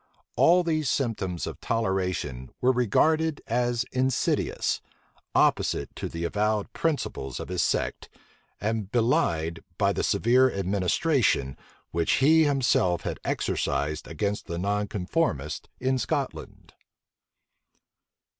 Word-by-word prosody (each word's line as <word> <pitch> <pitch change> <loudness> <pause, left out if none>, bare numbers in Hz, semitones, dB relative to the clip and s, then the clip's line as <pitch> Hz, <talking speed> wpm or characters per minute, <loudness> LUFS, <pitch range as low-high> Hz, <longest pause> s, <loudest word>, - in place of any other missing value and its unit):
All 180 +1 +5
these 155 -4 0
symptoms 100 - -1
of - - -7
toleration 90 - -1
were 125 - +4
regarded 155 +6 +2
as 120 0 0
insidious; 130 -1 0 0.5
opposite - - +2
to - - -4
the 85 0 -5
avowed 105 +4 0
principles 100 - -2
of - - -6
his 90 -1 0
sect, - - -1 0.5
and 105 -1 -2
belied 85 -9 +1 0.2
by 100 -1 +2
the - - -1
severe 130 +3 +3
administration 95 - +1 0.4
which 85 0 +1
he 160 +3 +5
himself 125 -11 +2
had - - -4
exercised 75 +1 -1
against 100 +6 -3
the 85 - -4
nonconformists 100 - -1
in 130 0 +1
Scotland. 110 - -4
105 Hz, 110 wpm, -26 LUFS, 90-130 Hz, 0.5 s, All